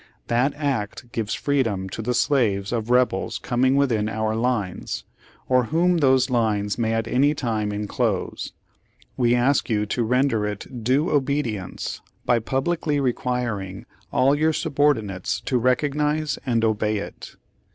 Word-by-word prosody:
That 125 Hz, +4 st, +2 dB
act 130 Hz, -5 st, -3 dB
gives 110 Hz, -2 st, -2 dB
freedom 115 Hz, -10 st, 0 dB
to 110 Hz, -, -5 dB
the 125 Hz, +2 st, -1 dB
slaves 115 Hz, -7 st, +1 dB
of 115 Hz, -1 st, -2 dB
Rebels 125 Hz, -6 st, +2 dB
coming 130 Hz, +2 st, +1 dB
within 115 Hz, -7 st, +2 dB
our 110 Hz, 0 st, -1 dB
lines, 115 Hz, -6 st, -2 dB, 0.4 s
or 125 Hz, -1 st, +3 dB
whom 170 Hz, +6 st, +2 dB
those 130 Hz, -2 st, +3 dB
lines 105 Hz, -3 st, 0 dB
may 115 Hz, -1 st, +1 dB
at 115 Hz, 0 st, -1 dB
any 140 Hz, +5 st, +3 dB
time 110 Hz, -6 st, -1 dB
inclose 105 Hz, 0 st, -2 dB, 0.3 s
— -, -, -33 dB
we 120 Hz, -1 st, +3 dB
ask 130 Hz, +3 st, +2 dB
you 105 Hz, -2 st, +1 dB
to 110 Hz, +4 st, -2 dB
render 125 Hz, -2 st, +1 dB
it 110 Hz, +4 st, -6 dB
due 135 Hz, +7 st, +2 dB
obedience 135 Hz, -9 st, -1 dB, 0.2 s
by 120 Hz, -, +3 dB
publicly 145 Hz, +5 st, -1 dB
requiring 120 Hz, -7 st, -2 dB, 0.3 s
all 135 Hz, +2 st, +4 dB
your 155 Hz, +2 st, +2 dB
subordinates 120 Hz, -12 st, 0 dB
to 125 Hz, -, 0 dB
recognize 150 Hz, +4 st, +1 dB
and 115 Hz, -2 st, +2 dB
obey 110 Hz, -1 st, +1 dB
it. 100 Hz, -, -8 dB
120 Hz, 140 wpm, -23 LUFS, 110-140 Hz, 0.4 s, all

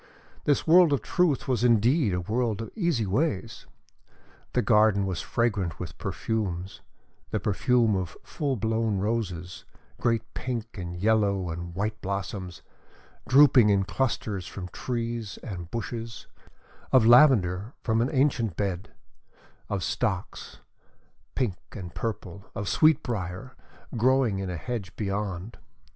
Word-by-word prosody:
This 145 Hz, -, +2 dB
world 170 Hz, 0 st, +6 dB
of 140 Hz, -, 0 dB
Truth 180 Hz, -7 st, +1 dB
was 125 Hz, -2 st, 0 dB
indeed 120 Hz, -, +4 dB
a 90 Hz, 0 st, -1 dB
world 110 Hz, +3 st, -1 dB
of 115 Hz, -, -6 dB
easy 170 Hz, -, 0 dB
ways!... 115 Hz, -, -1 dB, 0.9 s
The -, -, +2 dB
garden 105 Hz, -2 st, +4 dB
was 95 Hz, -3 st, -2 dB
fragrant 100 Hz, -8 st, -1 dB
with -, -, -7 dB
perfumes; 95 Hz, -4 st, -3 dB, 0.5 s
the -, -, -1 dB
perfume 115 Hz, +1 st, +2 dB
of 90 Hz, -4 st, -3 dB
full 140 Hz, -3 st, -2 dB
blown 110 Hz, -1 st, 0 dB
roses 95 Hz, -4 st, -3 dB, 0.4 s
great 115 Hz, -2 st, +1 dB
pink 120 Hz, -3 st, -4 dB
and 90 Hz, -3 st, -5 dB
yellow 100 Hz, -2 st, +1 dB
and 85 Hz, +1 st, -6 dB
white 105 Hz, +2 st, -2 dB
blossoms, 95 Hz, -2 st, -4 dB, 0.7 s
drooping 130 Hz, -4 st, +7 dB
in 100 Hz, -1 st, +3 dB
clusters 105 Hz, -5 st, -2 dB
from 95 Hz, -2 st, -7 dB
trees 115 Hz, -3 st, -4 dB
and 90 Hz, -5 st, -6 dB
bushes; 115 Hz, 0 st, -5 dB, 0.7 s
of 130 Hz, -4 st, +6 dB
lavender 115 Hz, -5 st, +5 dB
from 115 Hz, -1 st, +1 dB
an 125 Hz, -, +1 dB
ancient 130 Hz, -, +1 dB
bed; 100 Hz, -1 st, -2 dB, 0.8 s
of 100 Hz, -3 st, -2 dB
stocks 100 Hz, 0 st, -3 dB, 0.7 s
pink 115 Hz, -9 st, 0 dB, 0.2 s
and 90 Hz, -5 st, -7 dB
purple; 100 Hz, -4 st, -5 dB
of 100 Hz, 0 st, -4 dB
sweetbriar, 125 Hz, -, +1 dB, 0.4 s
growing 120 Hz, -3 st, +2 dB
in 95 Hz, -1 st, -3 dB
a 90 Hz, -, -3 dB
hedge 100 Hz, 0 st, -5 dB
beyond. 100 Hz, 0 st, -3 dB
110 Hz, 125 wpm, -27 LUFS, 95-120 Hz, 0.9 s, drooping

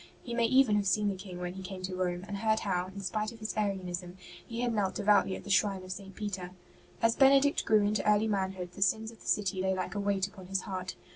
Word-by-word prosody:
He 240 Hz, -, -5 dB
may 235 Hz, 0 st, +2 dB
even 255 Hz, -4 st, +4 dB
have 200 Hz, -1 st, 0 dB
seen 205 Hz, +2 st, +2 dB
the 195 Hz, -, -2 dB
King 185 Hz, -1 st, -8 dB
when 180 Hz, 0 st, -4 dB
he 190 Hz, -, -8 dB
came 185 Hz, 0 st, -7 dB
to 185 Hz, 0 st, -3 dB
Rome, 180 Hz, 0 st, -2 dB
and 200 Hz, -, -4 dB
heard 220 Hz, +1 st, +1 dB
how, 180 Hz, -2 st, -1 dB
in 195 Hz, +1 st, -8 dB
spite 215 Hz, +3 st, -2 dB
of 230 Hz, -, -12 dB
his 215 Hz, -1 st, -5 dB
Arianism, 185 Hz, -3 st, -2 dB, 0.3 s
he 235 Hz, 0 st, -4 dB
had 240 Hz, -1 st, 0 dB
knelt 200 Hz, -3 st, 0 dB
devoutly 205 Hz, -2 st, +3 dB
at -, -, -8 dB
the 200 Hz, -, -5 dB
shrine 195 Hz, -1 st, +2 dB
of 185 Hz, -, -8 dB
St. 195 Hz, 0 st, -7 dB
Peter. 195 Hz, -4 st, -4 dB, 0.5 s
As 230 Hz, +1 st, +4 dB
Benedict 275 Hz, +1 st, +5 dB
grew 215 Hz, -2 st, +4 dB
into 210 Hz, 0 st, +1 dB
early 210 Hz, +1 st, +3 dB
manhood, 190 Hz, -3 st, -2 dB
the 185 Hz, -, -11 dB
sins 220 Hz, +4 st, +2 dB
of 230 Hz, -, -17 dB
the -, -, -12 dB
city 195 Hz, -3 st, +1 dB
lay 190 Hz, 0 st, +1 dB
like 185 Hz, -1 st, -3 dB
a 205 Hz, -, -3 dB
weight 200 Hz, -1 st, +1 dB
upon 190 Hz, -2 st, -12 dB
his 195 Hz, 0 st, -1 dB
heart. 185 Hz, -2 st, -5 dB
195 Hz, 260 wpm, -31 LUFS, 185-215 Hz, 0.5 s, Benedict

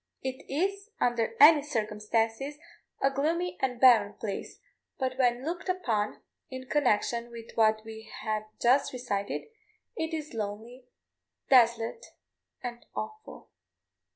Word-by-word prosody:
It 260 Hz, 0 st, -4 dB
is, 395 Hz, +8 st, -1 dB
under 230 Hz, -2 st, +1 dB
any 300 Hz, +1 st, +9 dB
circumstances, 225 Hz, +1 st, -1 dB, 0.5 s
a 275 Hz, -, +4 dB
gloomy 330 Hz, +6 st, 0 dB
and 250 Hz, -2 st, -1 dB
barren 225 Hz, -6 st, +6 dB
place; 200 Hz, -3 st, -5 dB, 0.4 s
but 260 Hz, -1 st, -1 dB
when 245 Hz, 0 st, +2 dB
looked 345 Hz, +3 st, -4 dB
upon 225 Hz, -, -1 dB, 0.3 s
in 260 Hz, -1 st, -7 dB
connection 235 Hz, -4 st, +1 dB
with 230 Hz, -1 st, -10 dB
what 220 Hz, -1 st, +3 dB
we 220 Hz, 0 st, -10 dB
have 215 Hz, -1 st, -1 dB
just 260 Hz, +4 st, +3 dB
recited, 205 Hz, -6 st, -3 dB, 0.5 s
it 320 Hz, -6 st, -2 dB
is 310 Hz, -3 st, -5 dB
lonely, 225 Hz, +4 st, -6 dB, 0.6 s
desolate, 235 Hz, -, +4 dB, 0.6 s
and 240 Hz, -1 st, -6 dB
awful. 435 Hz, 0 st, -7 dB
245 Hz, 120 wpm, -29 LUFS, 225-285 Hz, 0.6 s, any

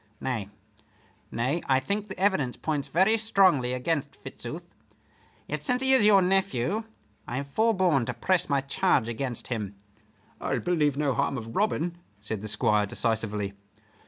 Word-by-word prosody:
Nay, 110 Hz, -7 st, -3 dB, 0.8 s
nay, 130 Hz, +9 st, -1 dB
I 130 Hz, -1 st, +4 dB
think 200 Hz, +10 st, -3 dB
the 190 Hz, -, -8 dB
evidence 185 Hz, -10 st, +1 dB
points 150 Hz, -3 st, -2 dB
very 195 Hz, +6 st, +3 dB
strongly 185 Hz, -, +3 dB
against 140 Hz, +4 st, -2 dB
Fitzooth; -, -, -8 dB, 0.7 s
yet 150 Hz, 0 st, -4 dB
since 250 Hz, +6 st, +1 dB
he 265 Hz, 0 st, +7 dB
is 225 Hz, -6 st, +6 dB
your 200 Hz, -3 st, +6 dB
nephew 190 Hz, -, +1 dB, 0.4 s
I 120 Hz, -, -4 dB
have 140 Hz, +1 st, -4 dB
forborne 185 Hz, -, +2 dB
to 125 Hz, -, -3 dB
press 180 Hz, +9 st, 0 dB
my 140 Hz, -1 st, +2 dB
charge 140 Hz, -3 st, +1 dB
against 120 Hz, +1 st, -4 dB
him." 105 Hz, -5 st, -4 dB, 0.7 s
"I'll -, -, -1 dB
believe 150 Hz, -6 st, +1 dB
no 145 Hz, -2 st, +1 dB
harm 140 Hz, 0 st, 0 dB
of 115 Hz, -1 st, -7 dB
Robin," 175 Hz, -4 st, 0 dB, 0.2 s
said 105 Hz, 0 st, -5 dB
the 110 Hz, -, -5 dB
Squire, 105 Hz, 0 st, +2 dB
decisively. 105 Hz, -2 st, -1 dB
140 Hz, 155 wpm, -27 LUFS, 120-190 Hz, 0.8 s, he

